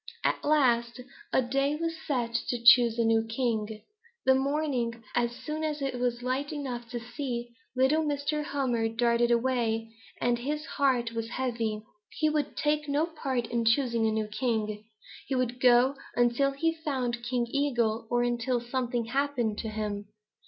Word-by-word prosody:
At - - 0
last 240 -6 +2 0.3
a 260 - +3
day 275 +4 +1
was 330 +1 -2
set 245 -7 -2
to 245 - 0
choose 235 0 +6
a 230 - +2
new 225 0 +3
king. 225 -2 -2 0.4
That 265 - +6
morning, 265 -4 -1
as 240 0 0
soon 305 +5 -5
as 305 -1 -1
it 270 -3 -2
was 245 -1 -1
light 265 +4 -1
enough 250 -6 -5
to 245 -1 -4
see, 240 0 -4 0.3
little 265 +5 +3
Mr. 300 0 -1
Hummer 250 -6 0
darted 235 +1 +2
away, 230 -2 +1 0.3
and 240 0 +1
his 300 +5 -3
heart 255 -7 +1
was 230 0 -4
heavy. 230 -4 -2 0.3
He 310 -1 +2
would 300 -2 -1
take 300 -1 0
no 290 +3 +2
part 275 -7 -2
in 235 0 -1
choosing 230 -1 +2
a - - +1
new 215 0 0
king. 215 -1 -2 0.4
He 270 - -1
would 250 -1 -1
go 250 +2 +5 0.2
until 240 +3 +3
he 325 +4 0
found 260 -7 -2
King 240 0 -1
Eagle 235 -6 0
or 240 0 +2
until 240 +1 0
something 240 -1 -2
happened 245 -4 -1
to 225 - -3
him. 210 -1 -4
245 Hz, 165 wpm, -29 LUFS, 235-280 Hz, 0.4 s, choose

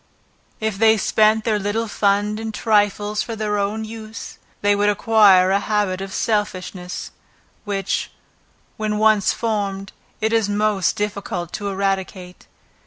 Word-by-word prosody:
If 220 -3 -2
they 220 0 +5
spent 215 +1 +3
their 215 -2 +1
little 205 +3 -1
fund 205 +1 +1
in 225 0 -4
trifles 210 -1 +1
for 230 - -4
their 210 -1 -1
own 210 +2 -2
use, 220 0 -9 0.2
they 205 0 +3
would 205 +1 +2
acquire 205 -3 +5
a 200 - +3
habit 205 -3 -1
of 195 0 -6
selfishness; 185 -4 -3 0.5
which, 200 -2 -2 0.7
when 215 -1 -1
once 215 -2 +4
formed, 200 -4 -2 0.3
it 220 +1 0
is 225 -3 +2
most 205 -2 +1
difficult 200 -5 -4
to 205 -1 -4
eradicate. 190 -2 -3
205 Hz, 135 wpm, -21 LUFS, 195-215 Hz, 0.7 s, they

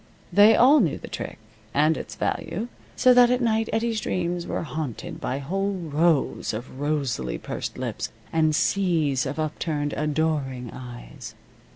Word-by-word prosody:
They 205 +2 +7
all 275 +5 +7
knew 170 - +1
the - - -9
trick, - - -6 0.4
and 155 +3 +4
its - - -7
value, 225 +6 -2 0.3
so 255 - +6
that 245 -1 +7
at 250 0 +2
night 225 -2 +1
Eddie's 225 0 0
dreams 175 -2 -2
were - - -2
haunted 155 -6 -5
by 130 - -2
whole 195 +8 -1
rows 160 -7 +1
of 125 +4 -8
rosily 135 - -1
pursed - - -5
lips, - - -3 0.2
and 155 -1 +3
seas 165 -7 +1
of - - -4
upturned, 155 -1 -2
adoring 150 -5 -1
eyes. 120 -2 -9
155 Hz, 150 wpm, -25 LUFS, 140-195 Hz, 0.4 s, They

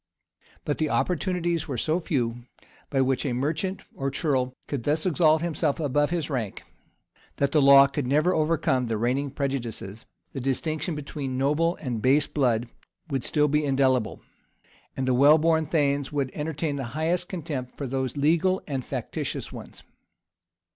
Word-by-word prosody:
[] - - -32
But 145 - -2
the 155 -1 +1
opportunities 175 -2 0
were 135 -4 -3
so 155 +8 +1
few, 120 -8 -2 0.4
by 135 -2 +1
which 130 0 +1
a 135 -5 -1
merchant 155 +9 -2
or 135 0 -2
ceorle 130 -4 0
could 140 -5 -3
thus 155 +5 0
exalt 160 -2 +3
himself 160 -3 0
above 145 -1 +1
his 170 -3 -1
rank, 120 -9 -3 0.7
that 140 0 0
the 150 - +4
law 140 0 +8
could 140 -1 -3
never 155 +7 +3
overcome 155 -6 +1
the 115 -1 -1
reigning 130 +5 0
prejudices; 120 -7 -4 0.3
the 135 - -4
distinction 155 +6 -2
between 140 -3 -5
noble 150 +6 +1
and 120 -6 -4
base 140 +5 +4
blood 120 -4 0 0.4
would 135 -3 -1
still 150 -1 +2
be 150 +1 +1
indelible; 130 -4 +1 0.8
and 130 -1 -1
the 130 - +3
well 140 +5 +6
born 160 0 +2
thanes 145 -3 +1
would 140 -3 -1
entertain 150 -1 -3
the 135 - -3
highest 175 +3 0
contempt 145 -8 -5
for 140 - -4
those 130 0 -3
legal 170 +6 +2
and 135 -4 -3
factitious - - -4
ones. - - -10
145 Hz, 160 wpm, -26 LUFS, 130-155 Hz, 0.8 s, law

